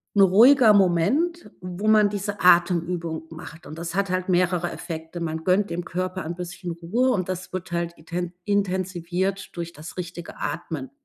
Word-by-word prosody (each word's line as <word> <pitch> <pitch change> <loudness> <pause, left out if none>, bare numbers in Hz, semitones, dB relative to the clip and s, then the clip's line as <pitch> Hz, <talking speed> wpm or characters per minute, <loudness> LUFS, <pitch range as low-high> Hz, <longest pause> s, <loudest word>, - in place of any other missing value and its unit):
'n 200 - +5
ruhiger 225 +6 +7
Moment, 210 - +2
wo 180 +4 -3
man 215 -1 +5
diese 205 0 -4
Atemübung 170 -2 +2
macht. 160 0 -10
Und 155 +2 -9
das 170 0 -5
hat 200 0 0
halt 185 +1 -1
mehrere 180 -1 +1
Effekte. 160 +1 -7
Man 160 -1 -3
gönnt 195 +3 +2
dem 175 +1 -3
Körper 185 +2 -3
ein 165 +2 -5
bisschen 180 0 -6
Ruhe 180 +10 0
und 185 -7 0
das 185 -1 -5
wird 175 -2 -5
halt 170 0 -2
iten 175 +2 -5
intensiviert 190 -1 -1
durch 170 0 -5
das 155 +5 -10
richtige 175 -1 -7
Atmen. 145 -2 -4
180 Hz, 170 wpm, -24 LUFS, 170-195 Hz, -, ruhiger